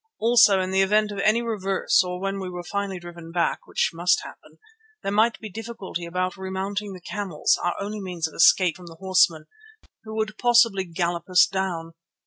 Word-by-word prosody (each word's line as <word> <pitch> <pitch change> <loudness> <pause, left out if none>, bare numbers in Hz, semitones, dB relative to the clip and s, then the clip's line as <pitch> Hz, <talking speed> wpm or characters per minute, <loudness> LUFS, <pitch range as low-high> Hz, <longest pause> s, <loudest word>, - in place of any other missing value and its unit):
Also 225 -4 +5
in 185 0 -2
the 190 0 +3
event 210 +2 +2
of 200 - -6
any 215 +4 +2
reverse 195 -6 +1
or 180 0 -5
when 195 +1 -3
we 185 -1 -5
were 180 -1 -7
finally 200 0 -3
driven 170 -1 -11
back, 170 -1 -1
which - - 0
must 175 +2 +1
happen, - - -13 0.5
there 195 - -2
might 220 +3 +2
be 220 - -7
difficulty 215 -4 -7
about 180 +1 -2
remounting 195 +2 -4
the 185 - -9
camels, 190 -4 0
our 175 - 0
only 205 +1 -5
means 175 -4 -3
of 160 - -14
escape 175 0 +4
from 180 -2 -13
the 165 - -11
horsemen 180 -3 +2 0.6
who 220 0 -8
would 215 -1 -3
possibly 230 -5 +4
gallop 170 0 -3
us 180 -1 +6
down. 175 -4 -3
190 Hz, 190 wpm, -24 LUFS, 175-210 Hz, 0.6 s, us